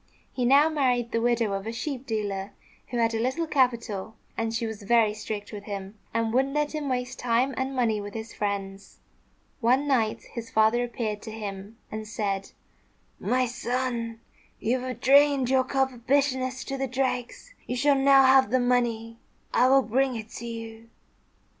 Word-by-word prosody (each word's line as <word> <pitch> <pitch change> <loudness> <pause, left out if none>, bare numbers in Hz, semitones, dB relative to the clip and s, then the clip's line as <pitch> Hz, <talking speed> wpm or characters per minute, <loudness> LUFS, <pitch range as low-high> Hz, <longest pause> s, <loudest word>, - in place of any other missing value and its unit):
He 250 - -1
now 280 +5 +6
married 255 -6 +1
the 230 - 0
widow 235 -3 +1
of 195 +2 -4
a - - -2
sheep 265 +2 -5
dealer, 205 -4 -3 0.3
who 245 - -4
had 230 -1 +2
a 225 - -1
little 260 +8 0
capital; 235 -8 0 0.2
and 225 0 -1
she 230 +1 -1
was 220 -2 -5
very 220 0 +3
strict 210 0 -6
with 205 -1 -7
him, 200 0 -6
and 230 0 0
wouldn't 270 +3 +1
let 295 0 +1
him 300 -2 -3
waste 250 0 -3
time 245 +3 +1
and 265 +1 -2
money 225 -4 +1
with 205 +1 -8
his 225 0 -6
friends. 200 -1 -4 0.6
One 260 +4 +2
night 230 -6 +1
his 230 -1 -6
father 220 +3 +3
appeared 220 -3 -3
to 220 - -8
him 205 0 -7
and 215 0 -5
said, 200 -3 -2 0.7
"My 255 0 +1
son, 240 -1 -3 0.4
you 250 +3 0
have 255 0 -6
drained 275 -1 +5
your 260 -1 +4
cup 265 0 0
of 240 0 -16
bitterness 260 -2 +1
to 275 0 -5
the 270 - 0
dregs. 255 - -3
You 250 - -2
shall 285 +3 +4
now 275 0 +6
have 260 -2 +6
the 255 +3 +2
money. 235 -2 0 0.3
I 250 - +5
will 270 +1 +5
bring 260 +2 +1
it 220 -1 -6
to 235 - -7
you." 225 0 -8
240 Hz, 180 wpm, -26 LUFS, 220-260 Hz, 0.7 s, now